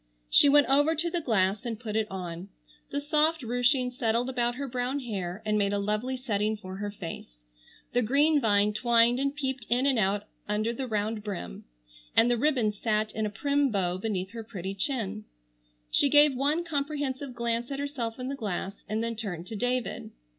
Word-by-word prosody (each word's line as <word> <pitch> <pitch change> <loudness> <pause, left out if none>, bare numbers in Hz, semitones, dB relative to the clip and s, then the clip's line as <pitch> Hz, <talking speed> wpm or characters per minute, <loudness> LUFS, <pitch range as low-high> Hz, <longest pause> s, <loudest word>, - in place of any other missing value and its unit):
She 285 - +7
went 290 0 +6
over 290 +4 +4
to 335 +2 -1
the 345 - -1
glass 200 -6 +1
and 230 -3 -4
put 220 -3 -5
it 220 -1 +1
on. 180 0 -6 0.4
The 285 - -1
soft 305 +1 +1
ruching 245 +2 +2
settled 240 +1 0
about 240 -1 0
her 280 +2 -4
brown 255 +2 -2
hair, 200 -5 -4
and 210 0 +2
made 200 0 +1
a - - +1
lovely 210 +6 -1
setting 215 -4 -1
for 190 -2 -8
her 205 +1 -3
face. 165 - -9 0.5
The 245 - +3
green 285 +6 +3
vine 210 -2 +3
twined 235 +2 +3
and 275 +1 0
peeped 265 -5 -3
in 245 +3 +2
and 270 -4 +3
out 200 0 +1 0.3
under 215 +2 0
the 260 +2 -4
round 215 -1 -1
brim 185 - -6 0.5
and 240 +2 +6
the 240 - +2
ribbon 250 -7 +2
sat 215 +1 0
in 215 0 -1
a - - -3
prim 280 +7 +1
bow 185 -4 0
beneath 190 -2 -2
her 230 -1 -6
pretty 195 -3 -5
chin. 215 -2 -2 0.7
She 280 - +4
gave 295 0 +6
one 290 +6 +1
comprehensive 285 -4 -3
glance 235 0 -1
at 275 - -3
herself 275 -5 -3
in 255 0 -5
the 275 - -2
glass 200 -4 -3 0.2
and 215 +2 -1
then 230 0 -2
turned 190 -6 -5
to 225 - -5
David. 245 +2 -2
235 Hz, 195 wpm, -28 LUFS, 210-270 Hz, 0.7 s, She